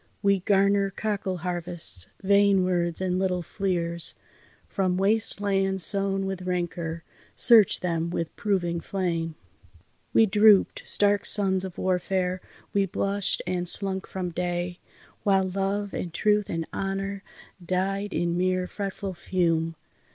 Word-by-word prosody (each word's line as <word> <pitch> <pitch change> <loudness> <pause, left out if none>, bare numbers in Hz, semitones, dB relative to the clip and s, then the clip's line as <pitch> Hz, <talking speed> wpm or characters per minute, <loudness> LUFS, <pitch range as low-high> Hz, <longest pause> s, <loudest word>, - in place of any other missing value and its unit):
We 200 -1 +3
garner 200 +1 +2
cockle 200 -2 -3
harvests, 175 - -2
vain 200 -1 +4
words 175 -1 0
and 185 -1 0
little 180 -2 -1
fleers. 170 -3 -2 0.5
From 185 -2 -1
waste 210 +3 +4
lands 195 -2 0
sown 195 0 +1
with 190 -1 -4
rancour, 175 -2 -3 0.3
search 225 -5 +5
them 170 -2 -1
with 170 -1 -4
proving 175 -5 -1
flame! 165 -4 -3 0.8
We 225 - +5
droop'd, 210 -1 +4
stark 205 0 +3
sons 190 -2 +4
of 185 -2 -7
warfare, 185 0 -1 0.3
we 200 -1 +2
blushed 200 +2 -2
and 180 0 -2
slunk 190 +1 +3
from 185 -2 -4
day, 175 +1 -3 0.4
While 195 -2 +2
Love 195 +2 -2
and 175 - -4
Truth 210 +3 +1
and 165 -1 -3
Honour 195 +1 -3 0.4
died 195 +3 -2
in 170 -2 -1
mere 185 0 0
fretful 195 0 -5
fume. 165 -2 -1
190 Hz, 130 wpm, -26 LUFS, 175-200 Hz, 0.8 s, search